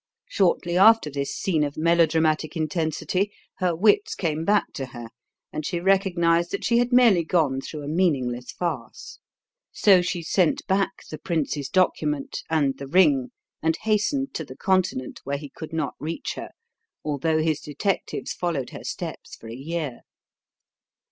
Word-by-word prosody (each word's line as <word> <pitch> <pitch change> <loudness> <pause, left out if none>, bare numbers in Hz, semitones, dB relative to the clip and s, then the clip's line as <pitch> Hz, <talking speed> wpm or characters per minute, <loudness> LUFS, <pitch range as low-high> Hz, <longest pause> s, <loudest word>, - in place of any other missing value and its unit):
Shortly 175 -2 +1
after 220 -6 +6
this 140 0 -3
scene 160 -6 0
of 145 -1 -3
melodramatic 160 -1 +2
intensity 160 +4 -1 0.3
her 180 -3 +1
wits 410 - +3
came 155 - -1
back 205 +2 +2
to 135 -2 -5
her, 120 -2 -9 0.4
and 155 - -3
she 170 +3 -2
recognized 175 -3 +2
that 200 - -4
she 235 0 +3
had 245 +1 +1
merely 235 -8 +5
gone 155 -6 +1
through 150 +1 -7
a - - -6
meaningless 135 -8 0
farce. 160 -9 -5 0.5
So 195 -3 +5
she 175 -1 -3
sent 175 0 +1
back 195 0 -1
the 155 - -6
prince's 150 -4 -2
document 150 -6 0
and 145 -4 +1
the 140 - -6
ring 145 -6 +4 0.3
and 160 0 +1
hastened 220 +6 0
to 160 - -3
the 130 -2 -11
Continent, 185 -9 0
where 140 +1 -2
he 145 0 -9
could 160 0 -9
not 160 -3 -2
reach 160 +3 -4
her, - - -7 0.6
although 155 +2 0
his 155 -1 +1
detectives 160 +7 -2
followed 165 -8 -2
her - - -9
steps - - -6
for 115 - -12
a 115 - -7
year. 145 -1 -4
160 Hz, 155 wpm, -24 LUFS, 145-185 Hz, 0.6 s, after